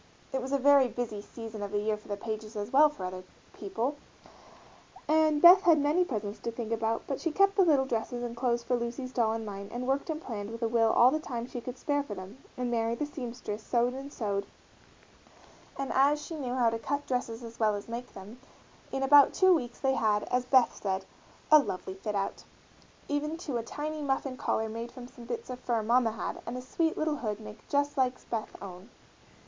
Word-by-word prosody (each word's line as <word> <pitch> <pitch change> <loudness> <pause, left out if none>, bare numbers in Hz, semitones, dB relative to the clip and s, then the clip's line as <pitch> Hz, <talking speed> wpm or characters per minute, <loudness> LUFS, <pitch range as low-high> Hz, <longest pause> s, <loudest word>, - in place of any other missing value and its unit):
It 265 - 0
was 260 +2 -5
a 280 - +3
very 275 -1 +6
busy 230 -4 -4
season 225 0 -8
of 200 -1 -4
the 205 - 0
year 215 +1 0
for 210 - -15
the 205 -1 -3
Pages 215 +1 -5
as 205 +2 -4
well 300 +3 +8
as - - -13
for 185 - -5
other 185 0 -5 0.3
people, 230 +8 -3 1.1
and 310 -1 +3
Beth 360 +3 +10
had 335 -4 +5
many 295 +5 +3
presents 215 - -4
to 235 - -3
think 230 -1 -5
about, 225 0 0
but 275 - -4
she 330 - 0
kept 395 +4 +3
the 395 - +5
little 295 -7 +4
dresses 240 0 -2
and 235 -1 -4
clothes 240 -1 0
for 245 +1 +1
Lucy's 240 +2 -4
doll 230 -3 +1
in 225 0 -4
mind 200 -1 -7
and 245 +1 -4
worked 270 +5 0
and 310 -1 -2
planned 215 -8 -5
with 230 +1 -6
a - - +3
will 225 -1 +3
all 245 +2 +6
the 310 - 0
time 240 -6 -4
she 245 -1 -6
could 250 +2 -7
spare 285 +2 0
for 245 -8 -6
them, 190 +6 -9 0.2
and 250 -1 -2
Mary, 230 0 0
the 295 - -2
seamstress, 240 -7 -6
sewed 240 +2 +1
and 270 +2 -7
sewed, 200 -6 -2 1.3
and 275 -1 -3
as 285 +3 +4
she 315 - -7
knew 255 -5 -3
how 240 -3 +3
to 225 - -3
cut 285 +5 -2
dresses 245 -2 -2
as 230 0 -10
well 215 -2 +3
as 205 - -7
make 235 +2 -6
them, 205 +6 -10 0.5
in 270 - -1
about 285 +1 +7
two 375 -1 +6
weeks 245 -7 -2
they 270 -1 +2
had, 210 -4 +2
as 250 0 +1
Beth 255 -2 +4
said, 190 -1 -1 0.5
"a 305 - +10
lovely 190 -8 -4
fit 205 +2 -4
out," 195 0 -2 0.6
even 300 +2 -1
to 290 -7 -3
a - - -1
tiny 300 +6 -5
muff 270 -1 0
and 255 -2 -5
collar 220 - 0
made 230 +2 -6
from 250 -2 -10
some 240 -1 -13
bits 450 - -5
of 250 - -6
fur 235 -3 -1
mamma 230 0 +3
had - - -5
and 240 +2 -3
a - - -5
sweet 320 +5 0
little 310 -1 0
hood 215 -5 -3
made 210 0 -10
just 285 0 +1
like 255 -1 0
Beth's 225 -2 -3
own. 190 +2 -10
245 Hz, 230 wpm, -30 LUFS, 220-280 Hz, 1.3 s, Beth